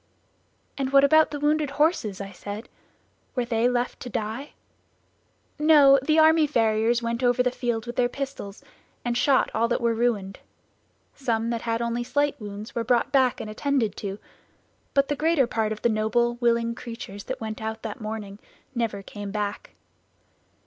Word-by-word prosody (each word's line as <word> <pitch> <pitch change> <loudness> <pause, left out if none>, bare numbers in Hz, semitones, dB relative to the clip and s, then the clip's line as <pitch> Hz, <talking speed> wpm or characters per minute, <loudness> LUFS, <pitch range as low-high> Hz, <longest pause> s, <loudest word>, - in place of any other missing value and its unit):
"And 265 -1 -1
what 275 0 +6
about 315 +2 +5
the 290 - -5
wounded 300 0 +1
horses?" 295 - +1
I 195 0 -6
said; 205 +4 -8 0.7
"were 250 -2 0
they 235 0 +2
left 245 0 -1
to 250 - -7
die?" 225 +6 -4 1.1
"No, 290 -3 +7
the 310 +4 +2
army 315 0 +6
farriers 230 -2 +2
went 235 +1 -2
over 245 0 +3
the 250 - +1
field 240 -3 -2
with 240 0 -7
their 245 -1 +3
pistols 265 -7 -6 0.4
and 240 0 0
shot 265 +2 +3
all 230 +1 +2
that 235 - 0
were 235 -1 +1
ruined; 220 -5 -1 0.7
some 230 -3 -1
that 230 -1 -2
had 230 0 -1
only 235 +1 -1
slight 285 +1 0
wounds 205 +1 -7
were 235 - -1
brought 245 +3 +1
back 260 -3 +3
and - - -5
attended 235 0 -1
to, 200 -2 -4 0.8
but 275 0 +4
the 290 - -1
greater 310 -2 +2
part 220 -2 -1
of 215 - -5
the - - +5
noble, 230 +2 +1
willing 235 -1 +2
creatures 230 -4 -8
that - - -4
went 220 -1 -5
out 220 0 -5
that 220 0 -6
morning 215 -2 -6 0.3
never 225 -5 -2
came 205 +1 -7
back! 205 0 -4
235 Hz, 170 wpm, -25 LUFS, 220-275 Hz, 1.1 s, No